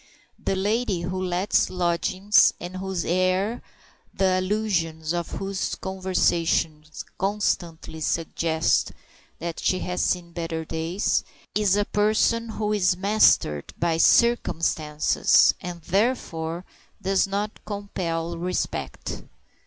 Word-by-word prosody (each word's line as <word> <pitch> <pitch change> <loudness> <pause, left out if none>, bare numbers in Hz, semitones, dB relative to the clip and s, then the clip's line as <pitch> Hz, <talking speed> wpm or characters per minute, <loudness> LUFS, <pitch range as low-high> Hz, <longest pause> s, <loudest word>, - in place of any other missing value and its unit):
The 195 - 0
lady 205 -1 0
who 185 +2 -3
lets 180 +2 +1
lodgings, 185 +3 +3
and 180 +1 -6
whose 190 -2 -3
air 185 +4 +1
and 240 - -8 0.5
the 185 -1 +2
allusions 175 -6 -1
of 170 -1 -2
whose 195 0 -3
conversation 175 -4 0 0.4
constantly 175 -5 -2
suggest 160 0 0 0.4
that 170 0 -5
she 185 - +1
has 180 0 -2
seen 175 -2 -1
better 165 -1 -4
days, 165 +5 -1 0.3
is 205 -2 +2
a 205 0 +1
person 220 +3 +1
who 215 -1 -2
is 185 -3 +2
mastered 195 - +3
by 170 -1 +1
circumstances, 165 -8 +3
and 175 -2 -7
therefore 175 -4 -1 0.3
does 195 +1 +1
not 205 +2 -3
compel 170 -5 -4
respect. 180 +1 -3
185 Hz, 110 wpm, -25 LUFS, 165-200 Hz, 0.5 s, lodgings